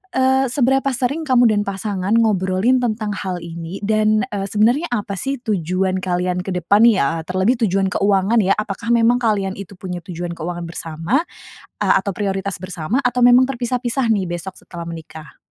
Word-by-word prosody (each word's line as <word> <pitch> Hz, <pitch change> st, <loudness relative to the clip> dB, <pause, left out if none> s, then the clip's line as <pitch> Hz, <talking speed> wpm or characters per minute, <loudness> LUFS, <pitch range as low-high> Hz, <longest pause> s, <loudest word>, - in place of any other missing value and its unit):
eee, 265 Hz, +1 st, +3 dB
seberapa 270 Hz, +1 st, +1 dB
sering 270 Hz, +5 st, -1 dB
kamu 245 Hz, -3 st, +5 dB
dan 205 Hz, -, +1 dB
pasangan 195 Hz, 0 st, -2 dB
ngobrolin 210 Hz, +3 st, +2 dB
tentang 215 Hz, -3 st, -1 dB
hal 185 Hz, -3 st, -4 dB
ini? 170 Hz, +2 st, -7 dB
Dan, 215 Hz, 0 st, +2 dB
eee, 195 Hz, -1 st, -2 dB
sebenarnya 240 Hz, +11 st, +2 dB
apa 205 Hz, -4 st, -3 dB
sih 275 Hz, +8 st, -2 dB
tujuan 185 Hz, -2 st, 0 dB
kalian 180 Hz, 0 st, -1 dB
ke 185 Hz, +2 st, -5 dB
depan 200 Hz, +5 st, +3 dB
ya, 165 Hz, -7 st, +2 dB
terlebih 190 Hz, +7 st, +1 dB
tujuan 195 Hz, 0 st, 0 dB
keuangan 200 Hz, +3 st, +2 dB
ya? 195 Hz, -2 st, +3 dB
Apakah 210 Hz, +2 st, -4 dB
memang 235 Hz, +1 st, +4 dB
kalian 205 Hz, -5 st, 0 dB
itu 200 Hz, 0 st, -9 dB
punya 180 Hz, -1 st, -5 dB
tujuan 175 Hz, -2 st, -5 dB
keuangan 175 Hz, +1 st, -5 dB
bersama, 165 Hz, +5 st, -3 dB, 0.7 s
eee, -, -, +4 dB
atau 200 Hz, -, -3 dB
prioritas 195 Hz, 0 st, -2 dB
bersama? 185 Hz, -, -2 dB
Atau 250 Hz, -1 st, 0 dB
memang 245 Hz, +1 st, +7 dB
terpisah-pisah 245 Hz, 0 st, -1 dB
nih 190 Hz, -4 st, -1 dB
besok 175 Hz, +2 st, -5 dB
setelah 170 Hz, -2 st, -8 dB
menikah? 160 Hz, -2 st, -10 dB
200 Hz, 165 wpm, -19 LUFS, 180-235 Hz, 0.7 s, memang